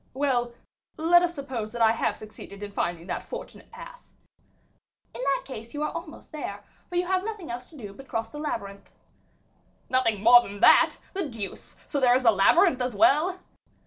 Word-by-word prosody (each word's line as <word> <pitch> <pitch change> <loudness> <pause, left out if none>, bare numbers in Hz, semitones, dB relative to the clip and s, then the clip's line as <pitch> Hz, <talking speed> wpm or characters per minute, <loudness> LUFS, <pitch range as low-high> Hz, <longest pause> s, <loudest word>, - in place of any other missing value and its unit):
"Well, 250 -4 0 0.4
let 340 +2 +5
us 350 -1 -1
suppose 255 -7 -5
that 240 - -4
I 220 - +6
have 225 -2 -1
succeeded 210 -1 -11
in 205 - -6
finding 175 -3 -3
that - - -3
fortunate - - -9
path." - - -11 1.1
"In - - -7
that - - 0
case, 235 -1 -9
you 295 - -2
are 300 - -1
almost 335 -1 -9
there, 205 -10 -6 0.3
for 355 - -7
you 355 +1 +1
have 370 +1 0
nothing 415 - -6
else 245 +1 -7
to 315 - -15
do 205 -6 -9
but 270 +5 -13
cross 225 -3 -3
the 295 - -9
labyrinth." 200 -9 -5 1.0
"Nothing 225 -6 +1
more 240 +2 +9
than 205 -3 -9
that? - - +6 0.2
The 380 -6 -3
deuce! 220 -5 -8
so 285 - -2
there 250 -2 +5
is 255 0 0
a 225 - +8
labyrinth 255 - +4
as 250 -3 -2
well." 310 - +3
255 Hz, 190 wpm, -26 LUFS, 215-320 Hz, 1.1 s, more